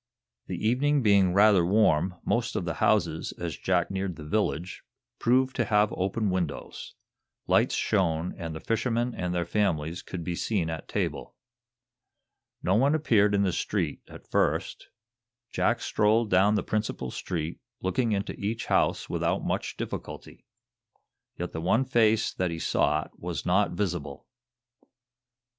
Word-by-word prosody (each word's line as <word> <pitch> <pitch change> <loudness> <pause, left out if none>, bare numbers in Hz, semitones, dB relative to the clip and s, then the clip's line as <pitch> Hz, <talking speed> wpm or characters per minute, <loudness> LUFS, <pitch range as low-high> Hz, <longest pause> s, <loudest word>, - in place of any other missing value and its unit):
The 110 - -2
evening 140 +4 +2
being 100 -4 +4
rather 100 -1 +5
warm, 90 -2 +3
most 115 0 0
of 90 - -1
the 85 - -2
houses, 85 -7 +1
as 85 -4 -5
Jack 90 -1 0
neared 95 -2 -3
the 75 - -9
village, 90 -1 -1 0.4
proved 130 +2 +2
to - - +2
have 105 -1 +2
open 100 +2 -1
windows. 90 -6 -4 0.5
Lights - - +3
shone, 90 -4 0
and 80 -3 -6
the - - -5
fishermen 115 +3 -1
and 90 -1 -3
their 90 -1 -1
families 85 -5 -1
could 90 -2 -6
be 90 - -3
seen 85 -2 -1
at 80 - -6
table. - - -3 1.3
No 90 - +2
one 135 +8 +3
appeared 105 -9 +3
in 100 - +2
the 95 -3 +1
street, - - -2
at - - -13
first. - - 0 0.6
Jack 120 -1 +1
strolled 110 0 +2
down 100 +3 +4
the - - 0
principal 105 - -2
street, 85 -3 -4 0.2
looking 110 +6 0
into 100 0 -1
each 110 +3 -3
house - - +1
without - - -1
much - - -2
difficulty. - - -7 0.9
Yet - - -4
the 80 - -5
one 110 +10 +2
face 115 -3 +2
that 90 -1 -1
he 85 - -4
sought - - 0
was 85 -1 -4
not 95 +1 +2
visible. 85 -7 -3
95 Hz, 150 wpm, -27 LUFS, 85-110 Hz, 1.3 s, rather